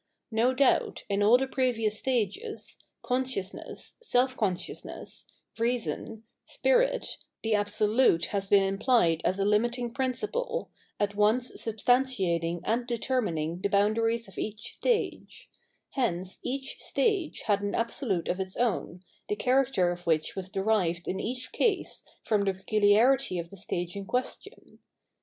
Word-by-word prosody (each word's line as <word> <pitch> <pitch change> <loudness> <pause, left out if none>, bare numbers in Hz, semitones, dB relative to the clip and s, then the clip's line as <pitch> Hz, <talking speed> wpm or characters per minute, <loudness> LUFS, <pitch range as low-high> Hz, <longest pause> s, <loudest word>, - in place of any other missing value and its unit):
^* - - -51 0.3
No 230 +3 +3
doubt, 260 0 +2
in 200 0 +1
all 220 +4 +7
the 265 - 0
previous 235 -5 0
stages, 260 - -2 0.2
"consciousness," 250 -6 -3
" - - -47
self 255 - +1
consciousneffl," 190 -7 -4
" - - -33
r^on," 230 -1 -2
" - - -56
spirit," - - +2 0.3
the 225 -1 +1
Absolute 205 -2 +3
has 195 -1 -1
b^&TimpSed 195 -3 +3
as 185 - +1
a 195 - +1
limiting 235 +3 +1
principle, 425 - -2 0.3
at 205 0 0
once'substanfeting 210 -5 +1
and" 240 +2 0
^(^rmining 195 -10 -1
the 200 - 0
boundaries 225 +3 +2
of 195 - -10
e«:h_ 215 0 -3
stage: 480 -3 -2 0.4
hence 190 -8 -2
each 270 +1 -4
stage 400 -9 0
had 205 -2 +1
an 205 0 -2
Abwlute 230 - -1
of 180 - -1
its 190 0 -4
own, 200 -6 -1 0.3
the 210 - +1
character 250 -7 +2
of 175 0 -7
which 155 -2 +1
was 190 -1 -5
derive^iii 190 -3 0
each 250 +3 -4
case 410 -5 0 0.2
from 210 -2 +1
the 195 - +1
]^culia'rity 215 +2 +3
of 170 0 -6
the - - -9
stage 175 -2 -4
in 200 -1 -5
question. 250 +1 -4
215 Hz, 140 wpm, -28 LUFS, 195-255 Hz, 0.4 s, all